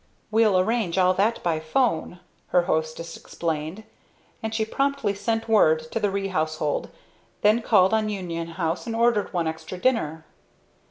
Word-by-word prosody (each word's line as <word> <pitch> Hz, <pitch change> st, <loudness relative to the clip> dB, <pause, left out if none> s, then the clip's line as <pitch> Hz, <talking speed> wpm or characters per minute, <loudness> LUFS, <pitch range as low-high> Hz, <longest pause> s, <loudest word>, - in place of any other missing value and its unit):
"We'll 215 Hz, -3 st, +4 dB
arrange 190 Hz, -2 st, 0 dB
all 185 Hz, 0 st, +4 dB
that 210 Hz, +5 st, 0 dB
by 165 Hz, -2 st, +1 dB
'phone," 165 Hz, 0 st, 0 dB, 0.3 s
her 180 Hz, -, +3 dB
hostess 160 Hz, 0 st, -2 dB
explained; 165 Hz, +4 st, -4 dB, 0.6 s
and 220 Hz, -, -3 dB
she 220 Hz, 0 st, 0 dB
promptly 275 Hz, -3 st, 0 dB
sent 225 Hz, +3 st, -2 dB
word 160 Hz, -8 st, +3 dB
to -, -, -1 dB
the 205 Hz, -, +1 dB
Ree 195 Hz, 0 st, -2 dB
household, 155 Hz, -4 st, -1 dB, 0.5 s
then 215 Hz, +3 st, +4 dB
called 190 Hz, -3 st, +4 dB
up 215 Hz, -1 st, +1 dB
Union 170 Hz, -5 st, -4 dB
House 165 Hz, +4 st, -3 dB
and 225 Hz, -, -3 dB
ordered 230 Hz, -2 st, +2 dB
one 175 Hz, -3 st, -1 dB
extra 160 Hz, +3 st, -5 dB
dinner. 160 Hz, -9 st, 0 dB
190 Hz, 155 wpm, -25 LUFS, 165-220 Hz, 0.6 s, We'll